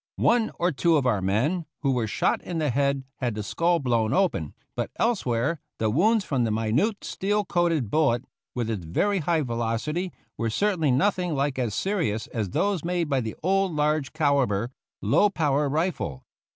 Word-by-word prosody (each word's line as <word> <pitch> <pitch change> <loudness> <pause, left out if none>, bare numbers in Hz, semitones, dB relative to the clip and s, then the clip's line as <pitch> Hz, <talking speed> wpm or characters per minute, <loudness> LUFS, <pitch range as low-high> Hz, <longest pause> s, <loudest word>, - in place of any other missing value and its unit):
One 230 -2 +3
or 175 +1 +1
two 165 +3 +3
of 140 - +1
cur 115 -6 +1
men 130 - 0 0.2
who 135 - +3
were 120 -4 0
shot - - 0
in 175 - -5
the 150 -4 +1
head 140 +1 +1
had 120 -4 -2
the 105 - -3
skull 170 - +1
blown 120 -6 +1
open, 180 - 0 0.2
but - - -2
elsewhere 160 - 0 0.2
the 110 -1 0
wounds 205 - +3
from 135 -4 0
the 115 - +1
minute 115 - 0
steel 205 +2 -1
coated 170 - +1
bullet, 135 -5 +2 0.3
with 120 -3 -1
its 110 -6 -3
very 195 - +1
high 165 -1 +1
velocity, 120 +9 -2 0.3
were 115 0 0
cer 200 - +1
tainly 155 -5 +1
nothing 175 +4 +1
like 140 -1 0
as 115 -6 -1
serious 165 - -1
as 110 -5 -3
those 195 - 0
made 175 -2 -1
by 135 -2 +1
the 110 -2 -5
old 195 0 +2
large 150 -1 +1
calibre, 135 -8 +1 0.3
low 210 - +4
power 150 -6 +1
rifle. 150 - -2
145 Hz, 180 wpm, -26 LUFS, 115-175 Hz, 0.3 s, low